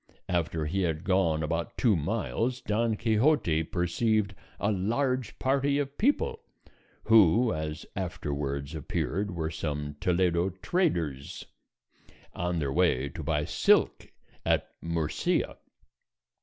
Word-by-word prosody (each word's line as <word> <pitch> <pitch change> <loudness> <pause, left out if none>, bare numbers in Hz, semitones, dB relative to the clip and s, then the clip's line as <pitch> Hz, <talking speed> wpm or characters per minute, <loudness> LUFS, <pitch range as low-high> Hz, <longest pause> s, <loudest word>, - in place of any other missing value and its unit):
After 85 -3 0
he 95 +6 -1
had 80 -2 -1
gone 90 -5 +2
about 85 +2 -3
two 115 -5 +3
miles 115 - -1
Don 115 0 0
Quixote 110 - +2
perceived 100 +5 0 0.3
a 100 - +1
large 125 +6 -1
party 140 +1 +1
of 140 -1 -2
people, 295 - +1 0.6
who 110 +2 +5
as 80 0 -4
afterwards 70 -5 -3
appeared 90 +5 -2
were 80 -3 -3
some 75 -2 -4
Toledo 90 +1 +2
traders, 90 - -1 0.9
on 90 0 -2
their 70 -4 -1
way 70 0 +2
to - - -7
buy 75 -2 0
silk - - +2 0.3
at - - +1
Murcia. 85 -2 -1
90 Hz, 115 wpm, -28 LUFS, 80-115 Hz, 0.9 s, who